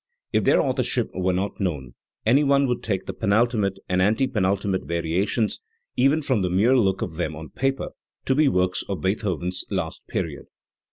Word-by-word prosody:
If - - +2
their - - +5
authorship 125 -3 0
were 95 0 0
not 95 +3 -2
known, 75 - -3 0.3
any 130 +7 +5
one 140 0 +4
would 125 -2 -1
take 95 -4 -2
the - - -5
penultimate 105 -2 +1
and 90 0 +1
anti 110 +7 +3
penultimate 100 -5 0
variations, 90 +7 -1 0.3
even 145 +4 +3
from 130 -7 +1
the 90 - 0
mere 105 +9 +3
look 95 -6 +2
of 80 - -6
them 80 -3 -2
on 80 -1 -9
paper, 135 0 -1 0.4
to 130 - +2
be 150 +2 +4
works 90 -6 +1
of 100 - -3
Beethoven's 90 -2 -1
last - - -4
period. - - -3
100 Hz, 175 wpm, -24 LUFS, 90-125 Hz, 0.4 s, their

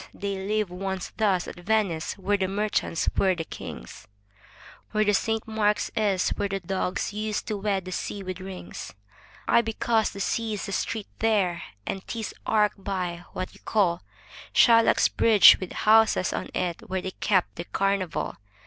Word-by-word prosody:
they 200 -1 -3
lived 200 0 -1
once 190 0 -4
thus 200 -5 +1
at - - -8
Venice 195 -4 0
where 200 +1 +1
the 190 -2 0
merchants 200 -4 -1
were 190 -2 +3
the 165 - -3
kings, 60 - -9 0.9
Where 215 -1 +3
Saint 225 +2 0
Mark's 210 -1 +1
is, 200 -4 +1
where 200 - -2
the 195 0 -2
Doges 185 +2 -2
used 215 0 -2
to 210 - -1
wed 195 -2 -1
the 185 - -6
sea 195 +2 -4
with 185 -1 -5
rings? 185 - -8 0.5
Ay, 235 - +5
because 225 -1 0
the 200 - -9
sea's 215 +1 -1
the 200 - -5
street 220 +2 -2
there; 195 -6 +1 0.2
and 195 - -3
'tis 225 -2 -4
arched 210 -2 +2
by 180 -3 -3
— - - -26
what 185 - -5
you - - -17
call 185 -6 +1 0.3
— 105 - -17
Shylock's 230 -1 +6
bridge 215 -4 +7
with 185 - -6
houses 220 -3 +4
on - - -4
it, 175 -2 -3
where 190 0 -1
they 190 - -3
kept 185 -1 0
the 170 - -5
carnival. 195 -2 -1
195 Hz, 170 wpm, -26 LUFS, 185-215 Hz, 0.9 s, bridge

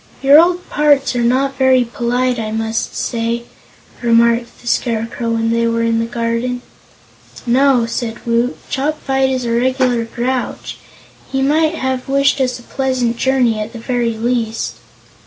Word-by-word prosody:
"Your 280 +3 +8
old 355 +2 +2
parts 285 -3 +2
are 240 - +1
not 265 +3 +1
very 260 -1 +4
polite, 245 +1 -1
I 220 -1 -3
must 225 +1 -2
say," 235 0 -2 0.6
remarked 235 0 +2
the - - -18
Scarecrow, 230 -1 -1
when 225 0 0
they 230 0 +1
were 230 0 0
in 230 0 +1
the 230 - 0
garden. 235 +1 -2 0.8
"No," 255 0 +3
said 230 0 -4
Woot, 235 +2 0
"Chopfyt 270 -2 0
is 255 -2 -2
a 235 - -1
regular 250 0 +1
grouch. 245 +2 -3 0.5
He 270 0 0
might 310 +3 +2
have 260 -2 -3
wished 275 0 +2
us 255 -1 0
a 240 - -14
pleasant 255 -3 -1
journey, 250 -4 +1
at 215 +2 -5
the 235 - -7
very 235 -1 -1
least." 230 -1 -2
245 Hz, 155 wpm, -17 LUFS, 230-265 Hz, 0.8 s, Your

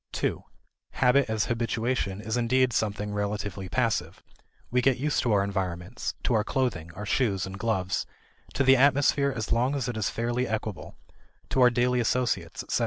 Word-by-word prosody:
2 - - -1 0.5
Habit 125 0 +3
as 110 -2 0
habituation 115 -3 -1
is 110 +1 -3
indeed 125 +1 +2
something 105 -1 -1
relatively 105 -2 -3
passive; 115 -1 -1 0.5
we 125 +1 +3
get 130 0 +3
used 145 +3 0
to 120 - 0
our 100 -1 +3
surroundings 95 +3 -3
to - - +1
our 110 -2 +3
clothing, 110 -11 -2
our 105 - -6
shoes, 100 -4 +1
and 95 0 -7
gloves; 95 -4 -1 0.5
to 135 - +2
the 135 0 +6
atmosphere 140 +1 +3
as 115 -5 -4
long 125 +4 +2
as 135 -3 -2
it 120 - -3
is 110 -2 0
fairly 120 +2 -1
equable; 110 -2 -4 0.5
to 130 - +1
our 125 - +8
daily 125 +1 +1
associates, 120 +1 -1
etc. - - -1
115 Hz, 175 wpm, -27 LUFS, 105-125 Hz, 0.5 s, our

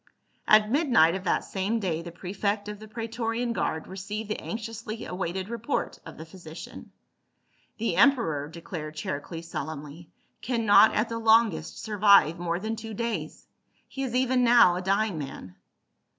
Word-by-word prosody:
At 215 0 +5
midnight 245 - +4
of 190 +1 -5
that 170 - +1
same 200 +4 -2
day 170 -6 -2
the 170 0 -8
prefect 200 +4 -3
of 210 -1 -6
the 215 - -11
praetorian 230 +2 -3
guard 160 -7 -2
received 205 +3 -6
the - - -2
anxiously 225 0 -6
awaited 185 +1 -4
report 235 +4 -3
of - - -10
the 160 - -8
physician. 165 -2 -11 0.4
" - - -41
The 220 -6 -1
emperor," 190 - +3
declared 160 -1 -7
Charicles 165 +3 -5
solemnly, 155 +1 -7 0.2
" - - -44
can 235 -2 -1
not 205 +1 +6
at 215 +2 +1
the 230 0 -3
longest 220 - +3
survive 200 -6 +4
more 170 0 -1
than 220 +3 -3
two 220 -1 -7
days; 210 -9 -4 0.4
he 270 - -7
is 255 -3 -2
even 255 0 +2
now 235 -7 +6
a 180 - -3
dying 195 -1 0
man." 135 -10 -8
205 Hz, 165 wpm, -27 LUFS, 170-225 Hz, 0.4 s, not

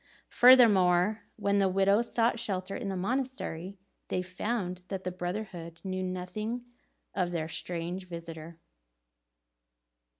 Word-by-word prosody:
Furthermore, 210 -5 +6
when 200 -1 +1
the 195 -1 +3
widows 200 +5 +3
sought 230 0 +2
shelter 195 -3 -3
in 215 -6 -4
the 190 - -2
monastery, 200 -5 -3 0.3
they 180 - -1
found 185 0 -3
that 190 -1 -4
the 185 - -2
brotherhood 175 -2 -5
knew 185 -1 -3
nothing 185 +6 -4 0.5
of 180 -3 0
their 165 -2 -2
strange 175 +3 -4
visitor. 165 -1 -8
185 Hz, 120 wpm, -30 LUFS, 175-215 Hz, 0.5 s, Furthermore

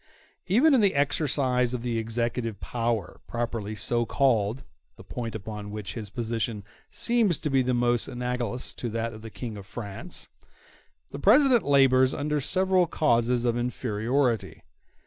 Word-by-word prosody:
Even 255 - +5
in 255 - +5
the 200 -6 +3
exercise 135 -3 +1
of 120 - -5
the 120 -2 -1
executive 115 -1 -2
power, 115 -5 -2
properly 115 -3 -3
so 120 +3 +1
called—the 115 - -1
point 115 -3 -5
upon 105 0 -6
which 105 -2 -6
his 110 -4 -6
position 115 -2 -3 0.3
seems 230 -8 +2
to 150 - -3
be 135 -1 +4
most 120 -1 +1
analogous 125 0 -3
to 120 - -4
that 115 +1 -3
of 110 - -10
the 110 - -8
King 110 -1 -7
of 100 -1 -10
France—the 100 - -10
President 250 - +5
labors 135 -2 +4
under 150 0 -1
several 185 +4 +2
causes 120 -5 +1
of 120 -1 +2
inferiority. 120 0 -1
120 Hz, 140 wpm, -27 LUFS, 110-140 Hz, 0.3 s, Even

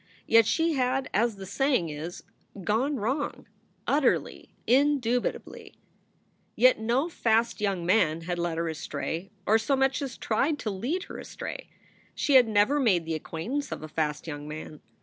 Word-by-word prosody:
Yet 225 -1 +5
she 325 +4 +2
had, 260 0 0
as 225 +1 +2
the 195 -1 -8
saying 250 - +1
is, 155 +4 -6 0.4
gone 245 +10 +1
wrong 260 +5 -2 0.4
utterly, 280 -2 +1 0.2
indubitably. 255 -2 0 0.8
Yet 255 -1 +5
no 240 +7 +1
fast 230 -7 +1
young 195 -4 -1
men 170 -4 +2
had 175 +1 -3
led 170 -1 -1
her 165 0 -1
astray, 160 +3 -4 0.2
or 220 +2 +4
so 275 +5 +1
much 270 +1 +1
as 270 -4 -5
tried 275 +7 0
to 220 -6 -3
lead 260 - -2
her - - -9
astray. - - -7 0.5
She 285 - 0
had 255 -3 +7
never 220 +7 +3
made 190 - +2
the 165 - -2
acquaint 160 - -5
ance 285 -1 -2
of - - -5
a - - -5
fast 150 -1 -2
young 145 -2 -6
man. 150 0 -8
225 Hz, 165 wpm, -27 LUFS, 170-270 Hz, 0.8 s, had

